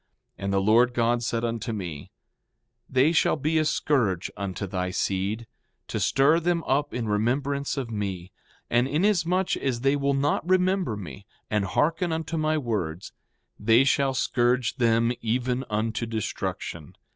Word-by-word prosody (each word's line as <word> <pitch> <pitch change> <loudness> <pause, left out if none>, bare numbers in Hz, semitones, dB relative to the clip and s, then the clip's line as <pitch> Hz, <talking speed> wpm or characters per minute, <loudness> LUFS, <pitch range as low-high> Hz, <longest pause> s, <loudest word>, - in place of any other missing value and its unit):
5:25 - - -49 0.4
And 100 - -1
the 100 - +3
Lord 115 +5 +4
God 120 0 +2
said 115 0 -1
unto 115 -1 -3
me: 85 -9 -6 0.8
They 130 +4 +3
shall 165 - +3
be 155 +2 +1
a - - +3
scourge 115 - 0
unto 100 +1 -4
thy 90 -1 -2
seed, 100 +5 -1 0.4
to - - -2
stir 145 +5 +3
them 170 0 0
up 140 +3 0
in 120 -2 -3
remembrance 135 +7 0
of 125 -4 -3
me; 95 -4 -4 0.4
and 120 +2 +2
inasmuch 180 +3 +1
as 125 -4 -2
they 135 +2 +3
will 140 -1 +1
not 145 +5 0
remember 185 - +2
me, 80 -10 -9 0.2
and 105 -2 +1
hearken 165 - 0
unto 160 0 -3
my 155 0 +1
words, 100 - -3 0.5
they 115 +4 +5
shall 135 -1 +2
scourge 125 -1 +1
them 115 -1 +3
even 125 +3 -1
unto 110 +2 -1
destruction. 100 -7 -4
120 Hz, 155 wpm, -26 LUFS, 105-145 Hz, 0.8 s, they